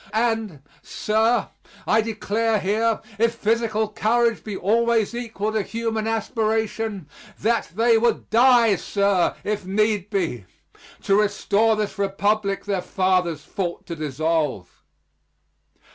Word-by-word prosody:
And, 220 - -1 0.2
sir, 220 +1 0 0.4
I 220 - +3
declare 220 0 -1
here, 220 +3 0 0.2
if 230 +1 +2
physical 220 -1 0
courage 230 +2 +1
be 205 -3 -5
always 230 +2 +1
equal 225 -3 -3
to 215 0 0
human 225 +1 -3
aspiration, 220 -4 -2 0.3
that 230 +2 0
they 230 +1 +4
would 230 -1 0
die, 235 -3 +5
sir, 200 0 +1
if 210 -1 -2
need 205 +1 0
be, 170 - -2 0.6
to 200 +1 +3
restore 210 +1 +2
this 210 -1 -3
Republic 200 +1 0
their 200 -3 -1
fathers 180 -5 0
fought 175 -3 -4
to 170 - -6
dissolve. 150 - -2
215 Hz, 115 wpm, -23 LUFS, 195-225 Hz, 0.6 s, die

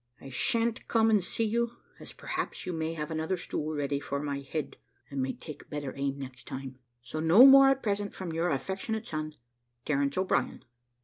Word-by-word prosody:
I 135 - -10
sha'n't 230 - 0
come 225 -1 +3
and 210 -4 +4
see 225 - -1
you, 235 +2 0 0.2
as - - -9
perhaps - - -4
you 180 - -3
may 160 0 -2
have 150 0 -4
another 160 +4 -1
stool 155 -2 -3
ready 140 -1 -1
for 140 0 -3
my 140 -1 -3
head, 140 +2 -5 0.3
and 140 -1 -2
may 130 - 0
take 155 - -10
better 145 -3 -4
aim 140 0 -2
next 130 -3 -9
time. 130 -1 -7 0.2
So 155 - -5
no 170 +11 +8
more 275 0 +9
at 270 0 +1
present 205 -1 -1
from 180 -4 -5
your 165 +2 +1
affectionate 195 - -2
son, 155 -4 -4 0.5
"`Terence 140 0 0
O'Brien.' 185 0 0
160 Hz, 190 wpm, -29 LUFS, 140-205 Hz, 0.5 s, more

